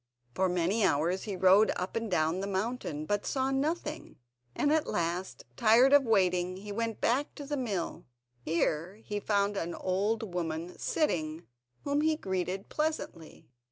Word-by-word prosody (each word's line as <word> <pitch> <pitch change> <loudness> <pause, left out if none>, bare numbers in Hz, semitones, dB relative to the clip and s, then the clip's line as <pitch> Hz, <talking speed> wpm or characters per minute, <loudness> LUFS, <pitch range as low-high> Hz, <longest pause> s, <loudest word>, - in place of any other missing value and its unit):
For 190 +5 +1
many 180 +5 +1
hours 170 +2 +1
he 205 -3 -3
rode 190 +3 +5
up 180 +1 -4
and 230 -1 -2
down 160 0 +1
the 195 - -3
mountain, 195 -6 -3
but 205 +4 0
saw 265 0 0
nothing, 300 +3 -2 0.4
and 290 - +2
at 315 -1 +1
last, 175 +2 -2
tired 235 - +5
of 285 -2 +6
waiting, 185 -4 +2
he 205 +2 -8
went 230 +1 -2
back 270 +5 0
to 285 - -7
the 290 +1 -2
mill. 210 -10 -3 0.4
Here 165 +4 -1
he 210 -1 -5
found 205 0 +1
an 170 -2 -3
old 205 +2 -1
woman 170 0 -3
sitting, 160 - -1 0.4
whom 285 +1 +1
he 315 0 +2
greeted 190 - -3
pleasantly. 300 - -4
200 Hz, 160 wpm, -30 LUFS, 180-240 Hz, 0.4 s, of